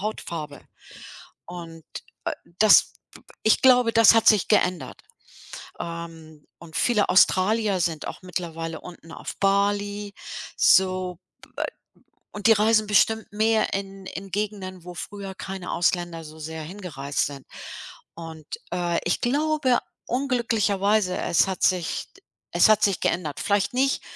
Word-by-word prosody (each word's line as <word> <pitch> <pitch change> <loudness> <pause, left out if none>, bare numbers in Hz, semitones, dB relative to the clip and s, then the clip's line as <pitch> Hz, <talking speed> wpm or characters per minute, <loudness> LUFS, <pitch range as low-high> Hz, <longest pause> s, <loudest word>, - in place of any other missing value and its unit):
Hautfarbe 165 -8 -5 0.8
und, 165 -2 -9 0.4
äh, - - 0 0.3
das 215 -1 +6 0.5
ich 220 - +4
glaube, 250 -3 +5
das 225 -1 +7
hat 225 - +3
sich 210 -4 +5
geändert, 175 -8 0 0.8
ähm, 165 -2 -8
und 160 -3 -11
viele 220 -4 +2
Australier 195 +2 +3
sind 160 -2 -1
auch - - -8
mittlerweile 165 -3 -5
unten 165 -2 -12
auf - - -8
Bali 205 +1 0 0.4
so, 185 -2 +3 1.1
und 205 +1 -2
die - - +8
reisen 215 +1 +3
bestimmt 220 +2 +3
mehr 220 +1 +1
in 195 0 -5
in 195 +1 -7
Gegenden, 195 -3 -4
wo 180 - -8
früher 195 +1 -7
keine 190 -1 -6
Ausländer 175 -1 0
so 155 +1 -12
sehr 160 +1 -6
hingereist 155 -6 -3
sind 140 -2 -9 0.7
und, 165 -2 -9 0.3
äh, 175 -1 0
ich 175 - 0
glaube 285 0 +2 0.3
unglücklicherweise, 215 -6 +1
es 170 - +2
hat 190 - -4
sich 180 -3 0
d - - -20 0.3
es - - +5
hat 215 0 +4
sich 195 -3 +2
geändert. 155 -6 -1
Vielleicht 205 +2 0
nicht 270 +2 +1
190 Hz, 130 wpm, -24 LUFS, 170-215 Hz, 1.1 s, die